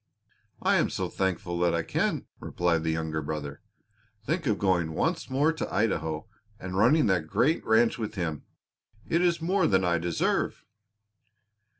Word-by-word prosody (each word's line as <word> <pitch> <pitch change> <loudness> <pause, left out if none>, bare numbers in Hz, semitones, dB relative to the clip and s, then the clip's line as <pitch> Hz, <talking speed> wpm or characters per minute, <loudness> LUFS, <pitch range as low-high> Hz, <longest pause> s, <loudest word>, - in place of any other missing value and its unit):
"I - - +4
am - - +2
so - - -3
thankful 90 -2 -2
that 85 -1 +2
I 85 - 0
can," - - -1
replied 85 -2 0
the 80 - 0
younger 80 -1 -2
brother. 75 -1 -5 0.6
"Think 165 +3 -1
of 105 -3 +2
going 85 -5 +1
once 165 - -1
more 145 +5 +2
to 160 - -4
Idaho 80 -5 -1 0.3
and 90 0 -6
running 120 +10 +4
that 90 -6 +1
great 150 - +1
ranch 115 +1 +3
with 110 -1 -4
him! 80 -6 -3 0.6
It 170 - +1
is 170 -2 +1
more 185 +1 +2
than 95 -2 +3
I 85 -1 +2
deserve." 85 0 -1
95 Hz, 160 wpm, -27 LUFS, 80-135 Hz, 0.6 s, I